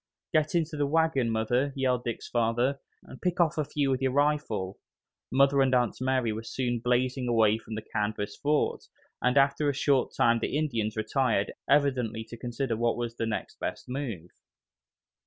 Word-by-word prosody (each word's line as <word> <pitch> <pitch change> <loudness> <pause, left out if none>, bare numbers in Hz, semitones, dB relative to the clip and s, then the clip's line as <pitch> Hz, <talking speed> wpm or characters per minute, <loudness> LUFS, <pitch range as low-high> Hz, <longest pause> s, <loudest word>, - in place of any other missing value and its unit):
"Get 155 +1 +2
into 165 -2 0
the 145 -1 +1
wagon, 160 -5 +2
Mother!" 120 +5 0
yelled 130 -2 0
Dick's 120 -2 -4
father, 120 +4 +1 0.2
"and 130 - -13
pick 180 0 -1
off 165 -2 +2
a - - +2
few 140 -1 -1
with 130 0 0
your 130 -1 +1
rifle!" 145 -10 0 0.5
Mother 135 +2 +4
and 130 -1 +3
Aunt 120 -3 +1
Mary 130 -4 +1
were 110 - -4
soon 120 +1 -2
blazing 125 +2 0
away 110 -2 +3
from 110 -1 -8
the 110 - -5
canvas 105 -1 -3
fort, 150 +1 0 0.4
and 125 +2 +2
after 140 +2 +3
a 140 - -1
short 135 -1 +1
time 115 0 +4
the 125 - -1
Indians 115 -8 -1
retired, 110 -1 0 0.2
evidently 130 -6 +2
to 120 - -7
consider 120 +1 -3
what 115 +1 0
was 120 -1 -4
the 115 - -1
next 110 - -4
best - - -4
move. 120 - -5
125 Hz, 175 wpm, -28 LUFS, 115-140 Hz, 0.5 s, Mother